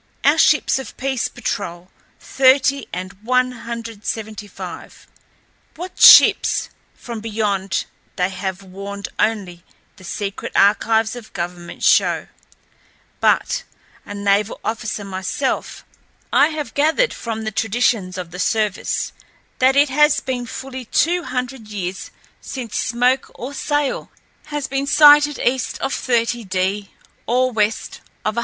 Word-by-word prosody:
Our - - +4
ships - - +4
of 265 - -9
peace 265 -2 -1
patrol 175 +2 -5 0.3
thirty 270 +1 +3
and 185 +2 -5
one 255 +2 +2
hundred 230 -3 -7
seventy 215 -2 -4
five. 200 - -9 0.7
What 360 +3 -8
ships - - +7 0.2
from 235 -2 -7
beyond 210 -3 -1 0.3
they 180 -1 0
have 190 0 -5
warned 200 +2 -7
only 190 -6 -1 0.3
the - - -15
secret 200 +2 -5
archives 220 +2 +3
of 235 -3 -10
government 175 0 -6
show; - - +3 0.9
but, - - +2 0.4
a 205 - -8
naval 200 +1 +1
officer 220 -2 -3
myself, 195 +7 -3 0.5
I 285 - +6
have 305 -6 -5
gathered 320 +13 +2
from 225 -2 -5
the 220 - -3
traditions 210 -3 0
of 175 -2 -6
the 180 - -8
service 210 +1 -1 0.5
that 260 +1 +4
it 285 0 +4
has 295 +2 +4
been 250 -3 -4
fully 260 +1 -7
two 345 +9 +1
hundred 250 -2 -4
years 190 -3 -5 0.3
since 245 -5 -6
smoke 250 +3 +1
or 255 +4 -7
sail 290 0 -1 0.4
has 295 -2 -4
been 275 +1 -2
sighted 295 0 +6
east 255 0 -1
of 270 - -2
30° 210 -5 -1 0.4
or 255 +2 +2
west 215 -1 -1 0.2
of 215 - +1
175°. 235 - -1
225 Hz, 130 wpm, -20 LUFS, 200-265 Hz, 0.9 s, ships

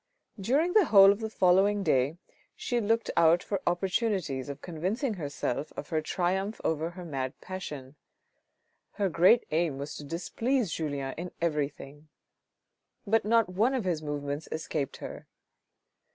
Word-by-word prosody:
During 285 - +1
the 425 -4 +6
whole 195 -5 +8
of 200 - -2
the 220 -1 -3
following 195 +1 +3
day 135 +1 +1 0.4
she 240 -2 -1
looked 225 +2 +1
out 170 +1 +5
for 200 -2 -3
opportunities 175 - 0
of 140 0 -6
convincing 190 - -2
herself 145 -4 -3
of - - -6
her 160 -2 0
triumph 190 +6 -1
over 160 +1 0
her 175 +1 -9
mad 135 -5 -4
passion. 150 -8 -7 1.0
Her 200 -2 0
great 180 +8 +5
aim 160 -3 0
was 140 +2 -6
to - - -8
displease 215 - -1
Julien 140 -4 -3
in 180 +1 -4
everything; 150 -2 -3 1.0
but 220 +1 +2
not 230 +1 +4
one 220 +9 +1
of 240 -6 -2
his 170 -4 0
movements 145 0 -4
escaped 155 -3 -3
her. - - -8
175 Hz, 145 wpm, -29 LUFS, 150-205 Hz, 1.0 s, whole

